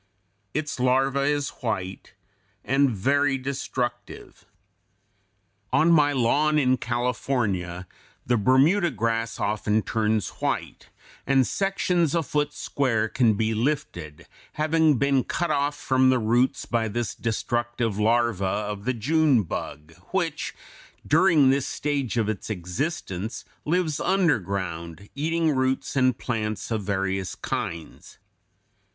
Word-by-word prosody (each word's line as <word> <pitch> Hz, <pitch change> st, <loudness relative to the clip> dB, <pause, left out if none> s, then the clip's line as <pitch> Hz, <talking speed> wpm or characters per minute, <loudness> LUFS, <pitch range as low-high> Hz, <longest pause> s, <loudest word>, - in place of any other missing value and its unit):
Its 150 Hz, -3 st, -2 dB
larva 135 Hz, +2 st, +2 dB
is 145 Hz, -1 st, 0 dB
white 95 Hz, -6 st, -4 dB, 0.5 s
and 135 Hz, +2 st, +3 dB
very 140 Hz, +6 st, +1 dB
destructive. 130 Hz, -2 st, -5 dB, 1.3 s
On 155 Hz, +6 st, +4 dB
my 150 Hz, -3 st, +5 dB
lawn 145 Hz, +4 st, +2 dB
in 130 Hz, -3 st, +3 dB
California 115 Hz, -8 st, -2 dB, 0.4 s
the 120 Hz, -, +2 dB
Bermuda 140 Hz, -, +4 dB
grass 115 Hz, -3 st, -2 dB
often 105 Hz, +1 st, 0 dB
turns 110 Hz, -3 st, 0 dB
white, -, -, -3 dB, 0.4 s
and 135 Hz, -1 st, +4 dB
sections 180 Hz, -4 st, 0 dB
a 165 Hz, -, +1 dB
foot 150 Hz, +1 st, -1 dB
square 120 Hz, -7 st, 0 dB
can 115 Hz, -1 st, +2 dB
be 110 Hz, +2 st, 0 dB
lifted, 110 Hz, -, -3 dB, 0.3 s
having 155 Hz, -1 st, +2 dB
been 135 Hz, 0 st, +2 dB
cut 175 Hz, -2 st, -2 dB
off 145 Hz, 0 st, 0 dB
from 130 Hz, 0 st, +3 dB
the 130 Hz, -, +4 dB
roots 120 Hz, +3 st, +1 dB
by 115 Hz, -2 st, 0 dB
this 115 Hz, 0 st, -3 dB
destructive 120 Hz, -1 st, -2 dB
larva 115 Hz, -2 st, +2 dB
of 105 Hz, +2 st, -2 dB
the 130 Hz, 0 st, 0 dB
June 140 Hz, 0 st, +3 dB
bug, 75 Hz, -2 st, -6 dB, 0.2 s
which 170 Hz, -5 st, -2 dB, 0.5 s
during 155 Hz, -4 st, +5 dB
this 135 Hz, 0 st, 0 dB
stage 140 Hz, -5 st, -2 dB
of 110 Hz, -3 st, +1 dB
its 110 Hz, -1 st, -4 dB
existence 100 Hz, -, -4 dB, 0.2 s
lives 160 Hz, -2 st, 0 dB
underground, 95 Hz, -, -1 dB
eating 160 Hz, +1 st, 0 dB
roots 130 Hz, +1 st, -1 dB
and 130 Hz, -2 st, +3 dB
plants 110 Hz, -2 st, -3 dB
of 110 Hz, -2 st, 0 dB
various 95 Hz, -1 st, -2 dB
kinds. 85 Hz, -1 st, -5 dB
125 Hz, 120 wpm, -25 LUFS, 110-145 Hz, 1.3 s, my